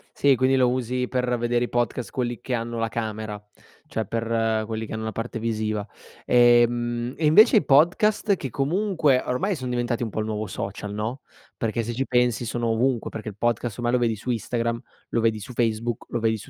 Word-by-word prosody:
Sì, 140 -2 +4
quindi 130 +2 +2
lo 130 -2 +4
usi 125 0 -1
per 125 -1 0
vedere 120 +1 +1
i - - -9
podcast, 120 0 -1
quelli 120 -2 -3
che 125 0 -2
hanno 115 0 -3
la 115 - 0
camera, 110 -2 -4 0.5
cioè, 110 - -3
per 115 0 0
quelli 110 0 -4
che - - -7
hanno 110 0 -4
la 110 - -3
parte 115 +2 -4
visiva. 110 -2 -2 0.4
Ehm, 120 0 +3
e 160 - 0
invece 215 +10 +7
i - - +3
podcast 190 +8 +4
che 135 -7 -5
comunque 155 - +1
ormai 185 +11 0
son 130 -4 -5
diventati 120 -1 -1
un 115 - -1
po' 110 - -4
il 110 - -1
nuovo 110 -1 -3
social, 100 +1 -5
no, 110 +6 -3 0.3
perché 115 0 -1
se 120 - -4
ci 135 +3 -2
pensi 125 -1 +1
sono 120 +1 -2
ovunque, 120 +1 0
perché 110 -1 -7
il 105 - -12
podcast 120 -1 -1
ormai 120 0 -1
lo 125 - +3
vedi 115 -2 +1
su 115 +4 -4
Instagram, 115 0 -2 0.3
lo 115 - 0
vedi 110 -1 +2
su 105 +5 -9
Facebook, 115 0 -1
lo 120 - -2
vedi 110 -1 +1
su - - -12
120 Hz, 210 wpm, -24 LUFS, 110-125 Hz, 0.5 s, invece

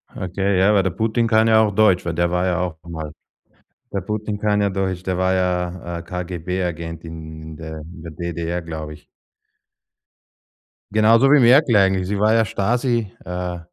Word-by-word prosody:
Okay, 95 +1 -1
ja, 100 +3 +4
weil 100 - +3
der 95 - 0
Putin 115 +3 0
kann 110 0 +3
ja 110 -1 +5
auch 105 -2 +2
Deutsch, 105 -5 +3
weil 85 - -2
der 85 +1 0
war 90 +1 +1
ja 90 -1 0
auch 90 -3 -3
mal 80 -3 -6 0.8
der 100 - -2
Putin 105 +2 -3
kann 105 0 +1
ja 100 - +2
Deutsch, 95 -2 -2
der 95 -1 -2
war 95 0 +1
ja, 90 -1 -2
äh, - - -8
KGB-Agent 90 -2 -4
in 80 -1 -9
in 80 0 -9
der 80 -1 -7
in 85 +2 -12
der 85 - -8
DDR, 85 +1 -4
glaube 80 -2 -6
ich. 75 - -16 1.9
Genauso 115 +5 +5
wie 150 - +7
Merkel 125 0 +5
eigentlich. 95 -2 +3
Sie 100 +1 -1
war 110 +1 +3
ja 115 -1 +3
Stasi, 115 +1 0
äh 90 0 -4
90 Hz, 185 wpm, -21 LUFS, 85-105 Hz, 1.9 s, wie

